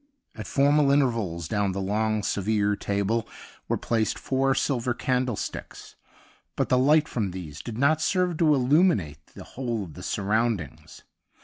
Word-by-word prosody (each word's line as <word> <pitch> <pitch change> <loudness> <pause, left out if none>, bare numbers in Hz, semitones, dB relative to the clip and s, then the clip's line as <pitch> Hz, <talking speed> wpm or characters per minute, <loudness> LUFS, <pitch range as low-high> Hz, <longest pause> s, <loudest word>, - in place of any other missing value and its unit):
At 110 - -8
formal 145 +1 +3
intervals 115 - +1
down 100 -1 0
the 100 - -3
long 105 +2 0
severe 105 +1 0
table 100 +3 -1 0.4
were - - 0
placed 110 -3 -1
four 135 0 0
silver 125 -3 0
candlesticks, 125 -3 -3 0.6
but - - -1
the 125 - +4
light 150 +3 +4
from 105 -5 -2
these 85 -6 -8
did 115 -2 -7
not 145 +4 +2
serve 180 0 +1
to 155 -2 +4
illuminate 130 - +2
the - - -9
whole 120 -5 -4
of 85 -5 -10
the - - -10
surroundings. 105 - -2
115 Hz, 145 wpm, -26 LUFS, 100-135 Hz, 0.6 s, the